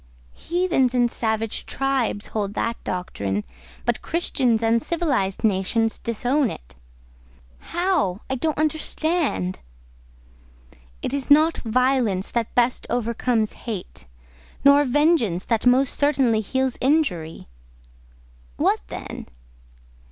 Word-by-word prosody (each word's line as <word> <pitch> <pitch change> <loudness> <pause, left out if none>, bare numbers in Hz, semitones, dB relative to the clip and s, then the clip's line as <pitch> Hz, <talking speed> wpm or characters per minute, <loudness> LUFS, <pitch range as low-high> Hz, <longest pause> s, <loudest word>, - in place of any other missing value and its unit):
"Heathens 340 -8 0
and 240 -1 +3
savage 220 -1 -2
tribes 270 -6 -1
hold 205 -2 -3
that 230 0 -2
doctrine, 100 - -3 0.4
but 240 -2 0
Christians 255 -9 +1
and 230 +1 +3
civilised 265 - -1
nations 220 +2 +1
disown 245 +4 0
it." - - -10 0.9
"How? 345 - -1
I - - -2
don't 310 +4 -1
understand." 310 - -1 1.4
"It - - -2
is 280 -1 -2
not 310 +3 +5
violence 240 -5 +1
that 235 -2 -2
best 245 0 +1
overcomes 235 -1 0
hate—nor 65 - -1
vengeance 260 - +2
that 230 +1 +1
most 255 +2 +4
certainly 265 -6 +2
heals 260 +4 -1
injury." 250 - 0 1.1
"What - - +2
then?" - - -7
245 Hz, 100 wpm, -23 LUFS, 210-280 Hz, 1.4 s, not